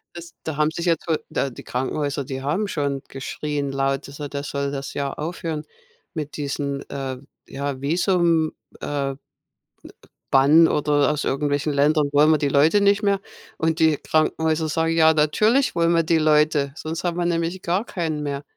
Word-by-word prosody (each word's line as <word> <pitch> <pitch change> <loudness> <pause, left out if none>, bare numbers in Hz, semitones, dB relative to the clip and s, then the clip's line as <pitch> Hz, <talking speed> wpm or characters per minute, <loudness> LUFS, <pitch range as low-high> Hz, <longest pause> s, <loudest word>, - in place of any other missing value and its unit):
Es 170 -1 -10
da 160 -3 -4
haben 155 +1 +2
sich 170 +2 -4
jetzt 165 -1 0
wohl 160 -2 0
da 135 - -1
die 120 - -11
Krankenhäuser, 140 +2 -2
die 130 0 -6
haben 160 +10 -1
schon 140 -6 -2
geschrien 140 +1 -4
laut, 135 0 -1
dass 140 +2 -11
er 145 -1 -5
das 145 +1 -5
soll 140 0 -2
das 140 -1 -5
ja 140 -1 -2
aufhören 160 -1 -4 0.5
mit 150 -2 -5
diesen, 140 -1 -3
äh, 135 -2 -4 0.3
ja 140 -1 -4
Visum, 170 +1 +2 0.3
äh, 140 -2 -2
äh, - - -8 1.2
Bann 145 +5 +6
oder 145 0 +2
aus 150 -1 -2
irgendwelchen 145 +1 0
Ländern 145 +1 +2
wollen 150 +2 +5
wir 155 - +3
die 145 - +1
Leute 155 +9 +4
nicht 200 +1 +3
mehr 200 -1 +2 0.4
und 160 0 +1
die 160 -2 +4
Krankenhäuser 160 0 0
sagen: 160 +1 0
„Ja, 160 -1 +5
natürlich 215 - +2
wollen 170 0 +2
wir 165 - +4
die 165 +1 +2
Leute. 150 -2 +2
Sonst 160 +1 -5
haben 175 -1 -1
wir 175 - 0
nämlich 170 +2 -1
gar 185 +7 -1
keinen 160 -4 -3
mehr.” 140 0 -3
150 Hz, 180 wpm, -23 LUFS, 140-165 Hz, 1.2 s, Bann